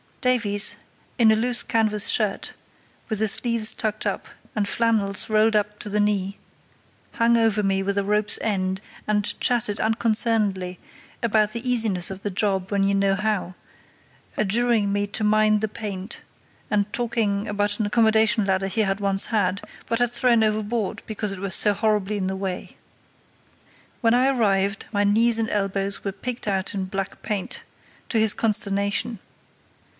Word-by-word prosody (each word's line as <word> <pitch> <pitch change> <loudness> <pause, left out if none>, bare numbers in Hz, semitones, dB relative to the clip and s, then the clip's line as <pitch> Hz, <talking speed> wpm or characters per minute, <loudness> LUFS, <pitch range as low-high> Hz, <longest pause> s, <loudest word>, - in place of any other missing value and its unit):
Davies, 225 -5 +2 0.4
in 225 -2 +6
a - - +4
loose 240 +2 +2
canvas 215 -2 +1
shirt, 210 -3 0 0.6
with 220 -3 -1
the 220 - +2
sleeves 230 +1 +2
tucked 215 -1 -2
up, - - -3 0.3
and 205 -2 0
flannels 215 -4 +1
rolled 215 0 +3
up 210 0 0
to 210 - -6
the 210 +1 -1
knee, 200 -1 0 0.8
hung 235 -2 +3
over 225 -2 +2
me 195 -1 +1
with 200 +1 -2
a 200 - +1
rope's 210 +1 +2
end, 190 -3 -1 0.3
and 210 -1 0
chatted 225 -4 0
unconcernedly 215 -5 +1 0.4
about 215 -2 +2
the 235 +2 -3
easiness 215 -7 +1
of 190 0 -8
the 205 - -3
job 195 -1 -1
when 200 -1 +1
you 200 0 +2
know 195 0 +2
how, 210 -3 -2 0.8
adjuring 215 0 +1
me 205 0 0
to 215 +2 -3
mind 215 0 +3
the 220 - 0
paint, 205 -1 -6 0.5
and 205 0 0
talking 220 -4 -1
about 205 0 -1
an 215 - +1
accommodation 220 -1 +3
ladder 190 0 0
he 220 +3 0
had 195 -1 0
once 195 -1 +3
had, 200 -3 0 0.3
but 230 0 -1
had 245 -1 +1
thrown 240 -2 +3
overboard 215 0 -1
because 210 -1 -3
it 195 - -6
was 195 -1 -3
so 210 - +4
horribly 210 -1 0
in 190 -2 -2
the 190 - -2
way. 190 -1 -5 1.3
When 230 -2 +3
I 255 +2 +3
arrived, 200 -6 +1
my 205 -2 +1
knees 225 +3 +4
and 225 0 0
elbows 195 -1 -2
were 195 - -2
picked 245 +3 -6
out 195 0 -1
in 190 -1 -2
black 195 +1 -5
paint, 210 -3 -4 0.5
to 225 - +1
his 220 -1 +4
consternation. 205 +1 -1
210 Hz, 165 wpm, -23 LUFS, 195-225 Hz, 1.3 s, in